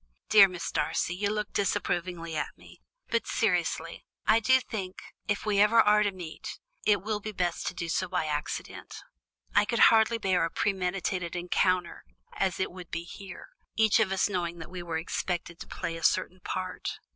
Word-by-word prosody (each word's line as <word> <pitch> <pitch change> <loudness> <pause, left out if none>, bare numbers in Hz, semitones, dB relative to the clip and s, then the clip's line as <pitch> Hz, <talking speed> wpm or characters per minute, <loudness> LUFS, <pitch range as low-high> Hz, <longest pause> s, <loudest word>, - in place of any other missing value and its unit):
Dear 210 -3 +9
Mrs. 180 -2 -5
Darcy, 180 - 0
you 200 +2 0
look 210 -1 -3
disapprovingly 175 -4 -1
at - - -3
me, - - -16 0.3
but - - 0
seriously, - - 0 0.2
I 220 - +5
do 260 +4 +5
think, 195 -7 -6 0.3
if 205 0 -1
we 205 -2 +2
ever 220 +2 +5
are 210 -1 +6
to 205 -1 +2
meet, 175 -4 -8 0.3
it 205 -3 +4
will 215 0 -1
be 215 +1 -5
best 180 -4 -2
to - - -3
do 170 - -4
so 185 +3 0
by 180 -3 0
accident. 150 -1 -5 0.5
I - - +5
could 235 +2 +6
hardly 225 +1 +4
bear 190 -5 +1
a 165 - +1
premeditated 185 -2 -1
encounter 180 0 0 0.3
as 190 -2 -1
it 190 - -1
would 180 -1 -10
be 165 +1 -4
here, 185 +1 -10 0.3
each 220 0 +4
of 210 -4 +2
us 190 - +2
knowing 175 -4 -2
that 165 - -9
we 180 -1 -6
were 170 -2 -3
expected 170 +1 -3
to - - -8
play 165 - -4
a 165 - -8
certain 185 0 +1
part." 185 0 -4
185 Hz, 185 wpm, -29 LUFS, 175-210 Hz, 0.5 s, Dear